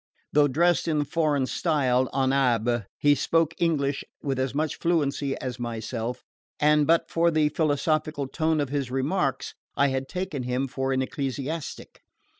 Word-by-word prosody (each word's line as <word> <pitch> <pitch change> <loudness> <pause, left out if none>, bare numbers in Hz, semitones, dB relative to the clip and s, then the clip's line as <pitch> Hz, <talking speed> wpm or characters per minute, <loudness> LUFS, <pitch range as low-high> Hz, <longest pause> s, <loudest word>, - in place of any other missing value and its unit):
Though 145 0 +5
dressed 170 +6 +2
in 155 -2 +1
the 145 - +1
foreign 150 -3 +1
style, 130 -5 +1
en 135 -1 +1
abbe, 120 -4 +1
he 145 0 +4
spoke 165 +3 +1
English 145 -5 +1 0.2
with 135 -2 -1
as 130 0 -1
much 155 +1 -1
fluency 145 -5 0
as 125 -1 -5
myself, 115 0 -4 0.4
and 150 0 +4
but 165 +1 +3
for 170 0 +3
the 155 -2 +2
philosophical 155 -1 0
tone 160 +2 0
of 145 -3 -1
his 140 -2 -2
remarks 135 +3 -1 0.2
I 140 0 +3
had 135 0 -3
taken 180 -6 -3
him 125 +2 -1
for 135 0 -2
an 130 0 +1
ecclesiastic. 140 +3 -5
140 Hz, 160 wpm, -26 LUFS, 130-155 Hz, 0.4 s, Though